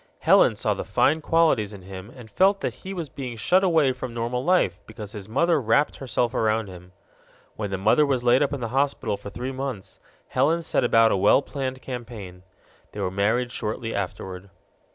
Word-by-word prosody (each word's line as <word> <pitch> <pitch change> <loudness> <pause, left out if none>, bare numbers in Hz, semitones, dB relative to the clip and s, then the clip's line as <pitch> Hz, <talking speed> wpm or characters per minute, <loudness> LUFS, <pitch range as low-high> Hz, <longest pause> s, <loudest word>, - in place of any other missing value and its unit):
Helen - - +4
saw - - 0
the - - -5
fine 155 +3 +2
qualities 155 -11 +2
in 95 -2 -11
him 95 +2 -9
and 125 -4 -11
felt 195 - +3
that - - -2
he 190 - -7
was 175 -5 -4
being 130 -3 -7
shut 180 - +3
away 160 -7 +3
from 125 -2 -6
normal 120 +2 -2
life 175 - +2
because 110 -2 -8
his 105 -1 -9
mother 165 +6 +2
wrapped 120 +6 +2
herself 120 -2 -1
around 110 -1 +1
him. 90 0 -12 0.6
When 105 -2 -4
the 95 - -2
mother 110 +10 +4
was 135 -4 0
laid 125 +2 +4
up 145 - +1
in 140 -3 -4
the 115 - -3
hospital 135 -4 0
for 100 - -9
three 125 +6 -5
months, 130 -7 -6 0.3
Helen 160 +6 +1
set - - 0
about 115 -2 +4
a - - +2
well 100 +8 +4
planned 130 -2 -5
campaign. 115 -8 -8 0.5
They - - -7
were 95 -2 -1
married 110 +6 0
shortly 115 0 -4
afterward. 95 0 -5
120 Hz, 195 wpm, -24 LUFS, 105-140 Hz, 0.6 s, Helen